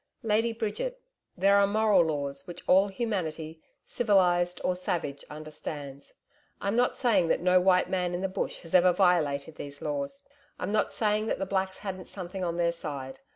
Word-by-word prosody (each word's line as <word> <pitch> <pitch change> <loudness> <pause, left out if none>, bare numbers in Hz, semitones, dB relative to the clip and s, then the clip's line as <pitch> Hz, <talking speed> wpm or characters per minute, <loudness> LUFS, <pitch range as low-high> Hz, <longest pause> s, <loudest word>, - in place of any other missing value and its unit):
'Lady 225 +1 +2
Bridget, 230 - -3 0.4
there 200 +2 +5
are 200 - +4
moral 210 -2 +4
laws, 140 -3 -3
which 175 - -9
all 190 +2 +5
humanity 165 -8 -3 0.2
civilised 180 -5 +2
or 180 - +1
savage 165 -6 -3
understands. 150 -2 -8 0.4
I'm 200 +2 -1
not 245 +1 +2
saying 205 -9 +3
that - - +2
no 180 0 +4
white 185 0 +4
man 180 -2 -1
in 175 - -3
the 190 - 0
Bush 190 - -3
has 165 - -10
ever 180 0 +6
violated 160 -5 +1
these 145 0 -7
laws, 280 -1 -4 0.3
I'm 185 - -3
not 215 0 +1
saying 215 0 0
that - - 0
the 195 - -2
Blacks 190 0 -1
hadn't 190 -2 -6
something 185 0 -6
on 170 -1 -2
their 170 -1 +2
side. 140 -5 -6
180 Hz, 175 wpm, -28 LUFS, 165-205 Hz, 0.4 s, ever